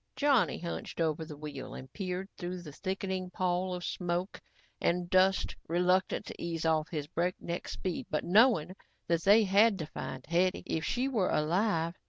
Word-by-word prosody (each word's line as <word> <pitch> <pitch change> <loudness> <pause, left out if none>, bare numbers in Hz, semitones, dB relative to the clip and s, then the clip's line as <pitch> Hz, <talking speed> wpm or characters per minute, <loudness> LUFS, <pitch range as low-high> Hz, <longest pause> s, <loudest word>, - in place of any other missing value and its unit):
Johnny 275 -3 +3
hunched 170 0 -6
over 160 -1 0
the 155 -2 -9
wheel 140 -3 -7
and 130 0 -10
peered 185 -1 -3
through 180 -1 -5
the 150 - -8
thickening 190 +2 -3
pall 180 0 -1
of 175 - -6
smoke 175 +2 -2 0.4
and 175 0 +1
dust, 190 +1 +3
reluctant 180 +3 +2
to - - -9
ease 165 -1 -3
off 160 -1 +2
his 150 -4 -3
breakneck 175 +2 -3
speed 185 -3 -4
but 150 - -1
knowing 185 -4 +4 0.3
that 170 -1 +1
they 210 +3 +7
had 205 +2 +4
to 160 - -4
find 155 - -7
Hetty 180 +2 +1
if 160 - -2
she 250 +9 0
were 220 -9 +1
alive. 165 +1 +1
180 Hz, 170 wpm, -31 LUFS, 165-190 Hz, 0.4 s, they